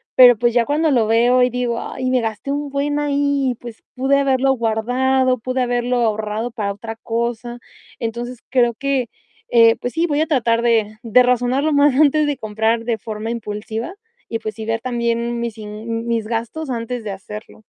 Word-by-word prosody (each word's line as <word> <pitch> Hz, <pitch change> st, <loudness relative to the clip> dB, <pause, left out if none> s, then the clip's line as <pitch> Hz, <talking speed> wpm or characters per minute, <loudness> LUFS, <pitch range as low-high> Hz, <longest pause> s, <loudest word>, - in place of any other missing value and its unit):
pero, 245 Hz, -3 st, +8 dB
pues, 240 Hz, 0 st, +1 dB
ya 240 Hz, -2 st, +3 dB
cuando 305 Hz, +2 st, +1 dB
lo 235 Hz, -5 st, +3 dB
veo 240 Hz, +3 st, +4 dB
y 250 Hz, -, +3 dB
digo: 245 Hz, -1 st, -2 dB
"Ay, 255 Hz, 0 st, -4 dB
me 255 Hz, -1 st, +2 dB
gasté 225 Hz, +5 st, -4 dB
un 290 Hz, 0 st, -2 dB
buen 285 Hz, +1 st, -1 dB
ahí, 285 Hz, -3 st, 0 dB
pues, 235 Hz, -2 st, -10 dB
pude 270 Hz, +2 st, +2 dB
haberlo 270 Hz, -1 st, +2 dB
guardado, 255 Hz, +3 st, +1 dB
pude 255 Hz, +2 st, -2 dB
haberlo 245 Hz, 0 st, 0 dB
ahorrado 220 Hz, 0 st, -1 dB
para 205 Hz, -4 st, -3 dB
otra 225 Hz, +2 st, -7 dB
cosa". 235 Hz, +1 st, -3 dB, 0.4 s
Entonces, 240 Hz, +1 st, -4 dB
creo 240 Hz, -2 st, +3 dB
que, 270 Hz, -2 st, -1 dB, 0.4 s
eh, 230 Hz, -1 st, +6 dB
pues 245 Hz, -, -3 dB
sí, 330 Hz, +1 st, +1 dB
voy 295 Hz, -1 st, +1 dB
a 315 Hz, -, +1 dB
tratar 235 Hz, -5 st, +2 dB
de 220 Hz, -2 st, +1 dB
de 245 Hz, +2 st, +5 dB
razonar 250 Hz, +2 st, +1 dB
lo 310 Hz, -1 st, +1 dB
más 285 Hz, -1 st, +4 dB
antes 305 Hz, +1 st, +4 dB
de 285 Hz, -3 st, -1 dB
comprar 220 Hz, +1 st, -1 dB
de 225 Hz, -3 st, -1 dB
forma 215 Hz, +2 st, -5 dB
impulsiva 220 Hz, -, -5 dB, 0.4 s
y, 225 Hz, -, 0 dB
pues 220 Hz, -1 st, -5 dB
sí, 220 Hz, -, -7 dB
ver 225 Hz, 0 st, -1 dB
también 235 Hz, -1 st, -1 dB
mis 235 Hz, -2 st, -4 dB
in 220 Hz, +2 st, -5 dB
mis 230 Hz, -2 st, -1 dB
gastos 235 Hz, +7 st, -3 dB
antes 240 Hz, 0 st, -3 dB
de 210 Hz, -, -5 dB
hacerlo. 210 Hz, +2 st, -9 dB
240 Hz, 190 wpm, -20 LUFS, 225-260 Hz, 0.4 s, pero